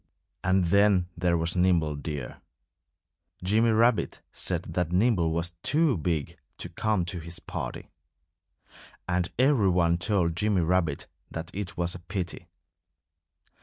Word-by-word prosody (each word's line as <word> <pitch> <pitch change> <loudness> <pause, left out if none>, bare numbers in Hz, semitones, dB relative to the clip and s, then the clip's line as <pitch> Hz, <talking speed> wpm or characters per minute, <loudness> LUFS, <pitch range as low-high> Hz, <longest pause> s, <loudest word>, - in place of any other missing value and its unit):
And 95 0 +3
then 100 -1 +3
there 85 0 +1
was 80 +1 -1
Nimble 85 -4 +2
Deer. 70 -3 -6 1.0
Jimmy 110 +5 +3
Rabbit 115 +1 +2
said - - -1
that 90 -2 -1
Nimble 95 -3 +3
was 85 +2 -1
too 155 - +3
big 80 -3 -2 0.2
to 90 - -5
come 105 0 0
to 90 +1 -3
his 85 +1 -4
party. - - -6 1.2
And 90 -1 0
every 130 -6 +4
one 85 -1 +2
told 90 -4 +1
Jimmy 105 -1 +1
Rabbit 85 -3 +1 0.2
that 85 +1 -6
it 100 -1 -5
was 85 0 0
a 90 - -8
pity. 90 0 -5
90 Hz, 130 wpm, -27 LUFS, 85-100 Hz, 1.2 s, every